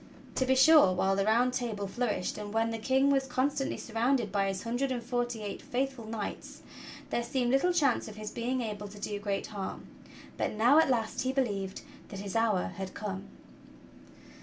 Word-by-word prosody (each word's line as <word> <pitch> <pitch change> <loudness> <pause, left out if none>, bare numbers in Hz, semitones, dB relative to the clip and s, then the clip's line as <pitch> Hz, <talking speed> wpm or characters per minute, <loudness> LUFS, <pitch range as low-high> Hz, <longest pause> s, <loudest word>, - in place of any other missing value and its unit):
To 260 - 0
be 265 - +4
sure, 265 - +7
w^hile 195 +1 +2
the 195 0 +1
Round 240 +4 +3
Table 225 -5 -2
flourished, 210 -1 -2
and 205 -1 -6
when 225 +1 +1
the 225 - -3
King 265 +5 +3
was 270 -1 +2
con 255 +2 +1
stantly 275 -1 -3
surrounded 235 -1 0
by 200 -1 +1
his 195 -1 -3
hundred 245 +4 -1
and 245 -2 -2
forty 240 -2 -2
eight 205 - -5
faithful 260 -2 -3
knights, 220 -2 -6 0.5
there - - +1
seemed 245 +1 0
little 270 +7 +3
chance 290 -8 +2
of 215 - -9
his 215 0 -6
being 250 +3 -1
able 210 -2 -4
to 205 +1 -12
do 205 0 -3
great 200 -1 -2
harm; 200 -3 -6 0.5
but - - -1
now 240 +8 +5
at 320 - +4
last 230 -2 0
he 260 0 0
believed 205 -8 -2 0.3
that 195 - -7
his 200 0 -6
hour 220 -5 +2
had 190 -1 -6
come. 195 -2 -5
230 Hz, 195 wpm, -30 LUFS, 205-260 Hz, 0.5 s, sure